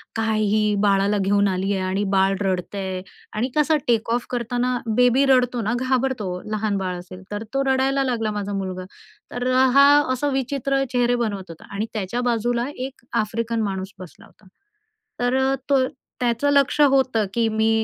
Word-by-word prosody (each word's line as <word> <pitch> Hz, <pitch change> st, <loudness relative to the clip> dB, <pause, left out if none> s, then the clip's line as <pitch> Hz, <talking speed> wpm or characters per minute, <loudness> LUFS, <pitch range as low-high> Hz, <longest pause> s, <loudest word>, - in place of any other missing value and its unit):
"काय 225 Hz, -1 st, 0 dB
ही 210 Hz, 0 st, +2 dB
बाळाला 200 Hz, 0 st, +3 dB
घेऊन 200 Hz, +1 st, +2 dB
आलीये 195 Hz, +1 st, -1 dB
आणि 185 Hz, +2 st, -1 dB
बाळ 195 Hz, 0 st, +3 dB
रडतंय" 190 Hz, 0 st, -2 dB, 0.3 s
आणि 230 Hz, +5 st, -1 dB
कसं 305 Hz, +1 st, +3 dB
टेक 230 Hz, -2 st, +1 dB
ऑफ 240 Hz, 0 st, -1 dB
करताना 245 Hz, +1 st, -1 dB, 0.2 s
बेबी 250 Hz, +2 st, +4 dB
रडतो 250 Hz, -2 st, +3 dB
ना, 220 Hz, +2 st, -1 dB
घाबरतो 255 Hz, -5 st, 0 dB, 0.2 s
लहान 215 Hz, -1 st, -1 dB
बाळ 185 Hz, -2 st, -3 dB
असेल 185 Hz, +1 st, -11 dB
तर, 205 Hz, +1 st, -4 dB
तो 275 Hz, 0 st, +1 dB
रडायला 270 Hz, +1 st, +2 dB
लागला 230 Hz, -4 st, -1 dB
माझा 205 Hz, -1 st, -4 dB
मुलगा. 185 Hz, -2 st, -4 dB, 0.5 s
तर 245 Hz, +1 st, -3 dB, 0.3 s
हा 280 Hz, 0 st, +8 dB, 0.3 s
असं 285 Hz, +3 st, -1 dB
विचित्र 270 Hz, +1 st, 0 dB
चेहरे 245 Hz, 0 st, +2 dB
बनवत 200 Hz, -4 st, -4 dB
होता 165 Hz, -, -13 dB
आणि 210 Hz, +2 st, -1 dB
त्याच्या 215 Hz, +3 st, -2 dB
बाजूला 240 Hz, 0 st, 0 dB
एक 260 Hz, -1 st, -7 dB, 0.2 s
आफ्रिकन 230 Hz, +2 st, -2 dB
माणूस 195 Hz, -2 st, -3 dB
बसला 185 Hz, -3 st, -12 dB
होता. 210 Hz, -, -23 dB, 0.7 s
तर 245 Hz, +1 st, +1 dB
अ, 265 Hz, +1 st, +2 dB
तो 265 Hz, -2 st, +3 dB, 0.3 s
त्याचं 240 Hz, +3 st, +1 dB
लक्ष 280 Hz, +1 st, +2 dB
होतं, 265 Hz, -6 st, +3 dB
की 230 Hz, 0 st, +1 dB
मी 220 Hz, 0 st, +1 dB
230 Hz, 165 wpm, -22 LUFS, 200-255 Hz, 0.7 s, हा